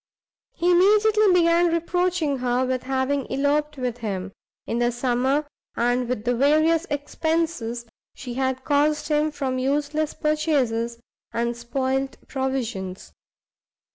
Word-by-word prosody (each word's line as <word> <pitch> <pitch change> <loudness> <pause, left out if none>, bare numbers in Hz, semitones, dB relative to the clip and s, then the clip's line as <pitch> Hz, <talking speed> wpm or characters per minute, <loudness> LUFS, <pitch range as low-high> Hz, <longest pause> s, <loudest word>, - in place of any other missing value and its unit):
He 350 +1 +2
immediately 420 +3 +5
began 345 -1 +4
reproaching 335 -3 0
her 250 +1 +1
with 255 0 -1
having 265 +1 -1
eloped 295 +2 +1
from 250 -3 -2
him, 200 -5 -4 0.3
in 235 - -2
the 240 0 +2
summer, 255 +4 0 0.3
and 245 +1 +1
with 250 -4 -2
the 245 - +2
various 310 +7 +3
expences 290 -5 -2 0.3
she 250 -2 -7
had 260 0 -1
caused 300 +2 +1
him 300 0 +2
from 270 -4 -2
useless 295 +3 -1
purchases 275 -7 0 0.3
and 235 +1 -1
spoilt 265 +3 -2
provisions. 240 -9 -3
270 Hz, 120 wpm, -24 LUFS, 245-310 Hz, 0.3 s, immediately